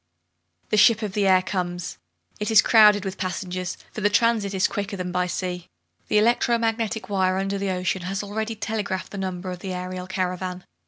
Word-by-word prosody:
The 215 - +1
ship 225 +1 +5
of 205 -3 -3
the 200 -1 +1
air 185 -1 +5
comes. 175 -2 -3 0.4
It 210 - -2
is 220 -1 +7
crowded 210 -3 +6
with 190 -1 -5
passengers, 185 -1 -3
for 215 - -6
the 205 - +3
transit 215 -1 +2
is 190 -1 +2
quicker 200 0 -4
than 180 -1 -4
by 180 0 0
sea. 180 -1 -4 0.4
The - - +2
electro 235 +2 +3
magnetic 225 -3 -1
wire 190 -2 +1
under 195 +1 -1
the 200 0 -1
ocean 185 0 -1
has 195 +3 -3
already 220 +2 -3
telegraphed 210 -3 -3
the 200 - -6
number 185 -1 -4
of 180 - -6
the 190 0 -5
aerial 180 0 -5
caravan. 185 -1 -3
190 Hz, 195 wpm, -24 LUFS, 185-210 Hz, 0.4 s, is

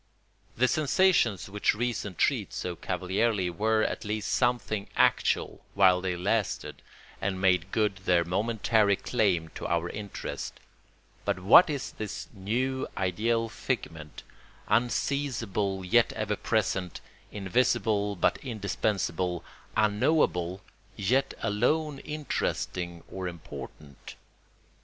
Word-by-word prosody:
The 130 +2 +4
sensations 150 - +2
which 105 +1 +1
reason 110 -4 -2
treats - - 0
so 90 -1 -3
cavalierly 95 +2 0
were 110 +4 +1
at - - -2
least 105 0 -2
something 120 -5 0
actual - - +2
while 95 -2 +5
they 90 -1 -1
lasted 100 +4 -1 0.4
and 95 -1 -1
made 95 -1 +2
good 105 -3 +1
their 90 -2 +2
momentary 105 +2 +2
claim 95 -8 0
to - - -6
our 85 0 0
interest; 100 -1 -6 0.6
but 100 -2 0
what 105 - +7
is 140 -4 -3
this 110 -1 -6
new 125 +7 -1
ideal 110 +5 +1
figment, 80 - -5 0.4
unseizable 115 -4 0
yet 120 +5 +4
ever - - -1
present, 90 -2 -1 0.3
invisible 105 0 +1
but 90 - +2
indispensable, 100 - -2 0.3
unknowable 105 - +2 0.3
yet 125 +7 +1
alone 140 +8 +1
interesting 90 - -3
or 95 -1 -5
important? 75 -4 -9
105 Hz, 105 wpm, -28 LUFS, 90-115 Hz, 0.6 s, what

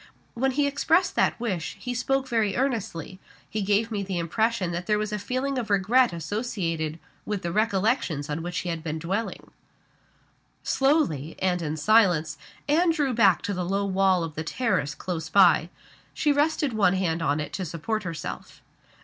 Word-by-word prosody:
When 265 +2 0
he 290 +2 +2
expressed 320 +5 +2
that - - +2
wish, 195 -6 -3
he 245 +4 -4
spoke 265 +2 0
very 225 -5 +1
earnestly 220 -8 -2 0.3
he 215 - -3
gave 205 +3 +1
me 205 -2 -1
the 190 -2 -3
impression 190 +3 0
that 175 +1 -4
there 210 -1 +3
was 210 0 -2
a 210 - -1
feeling 255 +5 -2
of 230 - -5
regret 210 +5 +3
associated 165 -3 -3 0.3
with 210 -3 -3
the 170 - -2
recollections 200 - 0
on 150 +1 -3
which 175 +1 -4
he 180 - -4
had 165 -1 -3
been 160 -1 -3
dwelling." 190 +8 -4 1.1
Slowly, 270 - +1
and 180 -2 0
in 155 -1 -3
silence, 165 -5 +3 0.3
Anne 330 +4 +3
drew 295 -5 +1
back 200 -6 +4
to 205 - -2
the 180 -1 -2
low 195 +3 -1
wall 190 -2 +2
of 165 -2 -5
the 160 - -4
terrace 185 - -1
close 165 0 -4
by. 195 +3 +5 0.5
She 300 - +2
rested 290 -2 +1
one 200 -4 +3
hand 170 -3 0
on 145 -1 +1
it 150 - -5
to 190 - -3
support 180 +7 -3
herself. 170 -5 -7
200 Hz, 175 wpm, -26 LUFS, 170-235 Hz, 1.1 s, by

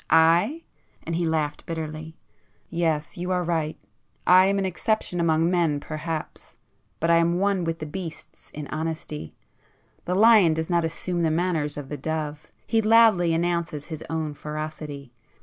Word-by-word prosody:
I?"—and 170 - +1
he 170 0 0
laughed 155 -2 -1
bitterly—"Yes, 160 0 -5
you 180 +1 -3
are 180 -1 +1
right; 160 -2 -1 0.5
I 185 +1 +7
am 200 0 +1
an 195 - 0
exception 185 0 -1
among 165 0 +2
men 165 -5 +2
perhaps,—but 155 +1 -6
I 170 0 +5
am 170 +1 +2
one 195 -1 +1
with 165 0 -2
the 155 - -6
beasts 165 +1 -8
in 150 0 -6
honesty! 155 - -4 0.7
The 180 - -1
lion 205 -6 +6
does 160 +2 -3
not 170 -1 +3
assume 170 +2 -2
the 165 - +2
manners 160 -3 0
of 140 -2 -6
the 150 - -4
dove,—he 155 +8 -3
loudly 215 -6 +5
announces 170 -3 -1
his 155 - -6
own 160 -1 -2
ferocity. 150 -3 -6
165 Hz, 145 wpm, -25 LUFS, 155-175 Hz, 0.7 s, I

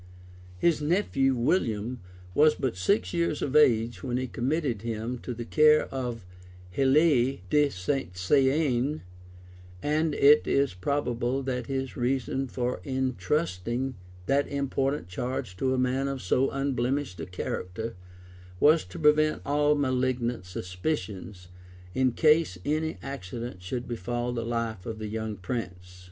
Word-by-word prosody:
[*] 90 0 -19
His 160 - +2
nephew 145 -5 +2
William 120 - 0 0.3
was 150 +5 +5
but 130 -7 -2
six 90 0 +1
years 170 -3 0
of 140 - -2
age 115 -8 +4
when 125 -1 -2
he 130 - -1
committed 130 -2 -1
him 115 +2 -3
to 125 - -6
the 120 0 -5
care 155 +3 +5
of 120 -6 -4 0.5
Helie 135 - +3
de 150 -1 +4
St. 90 -2 -2
Saen; 135 - +2 0.8
and 155 +1 +1
it 145 +2 +6
is 140 -4 +2
probable 125 +5 -1
that 125 -3 -3
his 135 -1 -3
reason 130 +2 -1
for 125 -5 -2
intrusting 130 - -1 0.3
that 140 +6 +2
important 140 -4 -1
charge 125 +1 -4
to 130 +6 0
a 130 - +1
man 130 +2 +1
of 135 -1 -3
so 125 +6 +1
unblemished 135 -5 -1
a 80 - -5
character, 90 +4 -4 0.6
was 155 +2 +5
to - - -10
prevent 155 -1 +3
all 145 +1 +3
malignant 130 -5 0
suspicions, 90 - -4 0.4
in 130 -1 +2
case 155 - +3
any 155 +2 -1
accident 120 -6 -6
should 120 +7 -4
befall 120 +1 -3
the 120 - -2
life 115 -4 -3
of 110 -1 -4
the 110 -1 -5
young 110 0 -3
prince, 105 +7 -2
{1110. 90 0 -19
130 Hz, 140 wpm, -28 LUFS, 115-140 Hz, 0.8 s, it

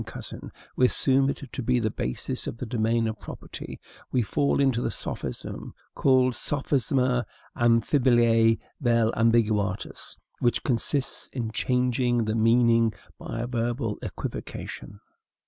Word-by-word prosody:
Cousin, - - -8 0.2
we 125 - +5
assume 135 +1 +2
it 140 - -4
to - - -4
be 125 +1 +2
the 110 -2 0
basis 60 - -4
of - - -5
the 125 - -5
domain 115 0 +1
of 110 -1 -4
property, - - -8 0.3
we 125 - +2
fall 140 +7 +1
into 135 -4 +2
the - - 0
sophism - - -5 0.2
called 130 -2 +3
sophisma 130 -3 0 0.3
amphiboliae 115 -1 +4 0.2
vel 115 -4 +3
ambiguitatis, 110 -4 0 0.2
which 120 - +1
consists 130 +3 0
in 115 -4 -3
changing 125 -1 +1
the 110 - -1
meaning 115 0 +4 0.3
by 115 - -5
a - - -2
verbal 120 -2 -2
equivocation. 100 - -6
120 Hz, 130 wpm, -26 LUFS, 115-125 Hz, 0.3 s, we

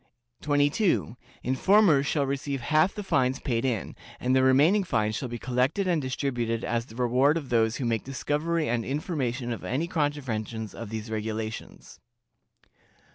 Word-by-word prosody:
"22. 145 - +1 0.3
Informers 150 +1 +4
shall 145 -2 +1
receive 140 0 -2
half 155 +8 +2
the 210 - -4
fines 130 -7 +1
paid 115 -3 -1
in, 120 -8 -2 0.2
and 130 +1 +1
the 130 - +5
remaining 145 +10 +4
fines 110 - 0
shall 130 - -4
be 120 - -4
collected 130 - 0
and 170 -4 +2
distributed 120 -4 -2
as 115 +1 -1
the 110 - -13
reward 125 +5 +3
of 145 -5 -6
those 115 -1 +2
who 130 - -3
make 115 -2 0
discovery 150 +4 -1
and 115 0 0
information 130 -4 -2
of - - -8
any 140 +6 -1
contraventions 125 - -2
of 115 -3 -7
these 110 0 -5
regulations. 110 0 -5
130 Hz, 155 wpm, -27 LUFS, 115-150 Hz, 0.3 s, the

